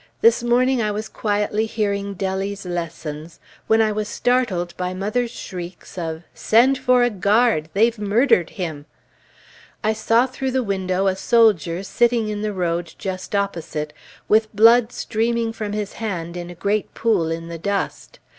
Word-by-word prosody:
This 460 - +5
morning 245 +1 +2
I 215 - 0
was 210 +1 -3
quietly 210 +1 -1
hearing 200 -2 -2
Dellie's 195 +1 -3
lessons, 165 -2 -5 0.3
when 220 0 +4
I 215 - +1
was 210 0 -2
startled 235 -10 0
by 180 0 -3
mother's 215 +6 -1
shrieks 180 -5 -8
of 165 -2 -4
"Send 255 +4 +3
for 250 -1 +4
a 245 - +2
guard 205 -4 +2
they've 225 +2 +2
murdered 210 - +3
him!" 160 -5 -5 1.0
I 215 +1 +2
saw 225 +3 +3
through 265 0 -4
the 260 -1 +1
window 190 -2 -1
a 190 -1 +2
soldier 190 - +3
sitting 235 +1 +1
in 210 -1 -3
the 215 0 -1
road 175 -3 -2
just 190 +1 -5
opposite, 165 -6 -2 0.3
with 215 0 +3
blood 230 +2 +6
streaming 230 0 -1
from 210 -2 -4
his 210 -1 -3
hand 175 -6 -4
in 175 0 -6
a 175 - -9
great 200 +4 -1
pool 200 -8 +1
in 165 0 -4
the 170 0 -7
dust. 200 +3 -3
205 Hz, 160 wpm, -21 LUFS, 180-230 Hz, 1.0 s, blood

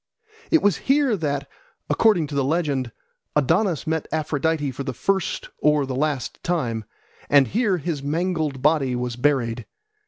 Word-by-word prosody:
It 325 - +4
was 205 -4 +3
here 275 -4 +4
that, 145 -5 -2 0.4
according 210 -8 +3
to 145 - -8
the 140 -1 +1
legend, 140 -4 0 0.4
Adonis 165 - +2
met 160 -1 -1
Aphrodite 155 -1 0
for 130 +2 -5
the 130 -2 -4
first 195 +3 -1
or 150 -1 +3
the 130 - -4
last 145 -2 -2
time, 120 -11 -1 0.4
and 140 -2 +5
here 210 -4 +1
his 155 -2 -3
mangled 155 -2 -1
body 140 -5 +2
was 125 -1 -3
buried. 125 -3 0
150 Hz, 150 wpm, -23 LUFS, 135-170 Hz, 0.4 s, and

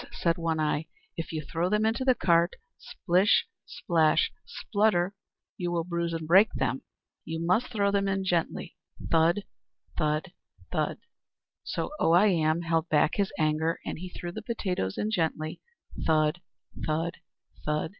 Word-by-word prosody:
said 170 -1 +1
One 165 -1 0
Eye, 155 0 0 0.3
"if 165 - -5
you 155 -1 -3
throw 170 +4 -1
them 210 +1 +2
into 225 +3 +1
the 260 -1 +4
cart, 170 -3 +3 0.2
splish 190 - +2 0.2
splash 160 -6 +2 0.2
splutter, 200 -4 +1 0.4
you 175 -1 -2
will 170 -1 0
bruise 170 0 -2
and 165 -1 -4
break 195 +6 +6
them. 130 0 -1 0.4
You 160 +1 -4
must 185 +9 +2
throw 200 -4 +1
them 200 0 +1
in 195 0 0
gently, 175 -3 -1 0.4
thud, 170 +5 +3 0.5
thud, 155 +4 0 0.4
thud." - - -1 0.7
So - - -3
Oh 165 - +3
I 200 +5 +6
Am 160 -2 +2
held 165 -1 0
back 155 +1 +3
his 200 -1 +1
anger, 155 +1 +1
and - - -4
he 180 +1 -6
threw 175 -1 -6
the 220 - -6
potatoes 185 - -2
in 215 - -1
gently, 160 -5 -1 0.5
thud, 155 +1 +2 0.5
thud, 165 +3 -1 0.5
thud. 150 +1 -1
170 Hz, 155 wpm, -28 LUFS, 160-195 Hz, 0.7 s, break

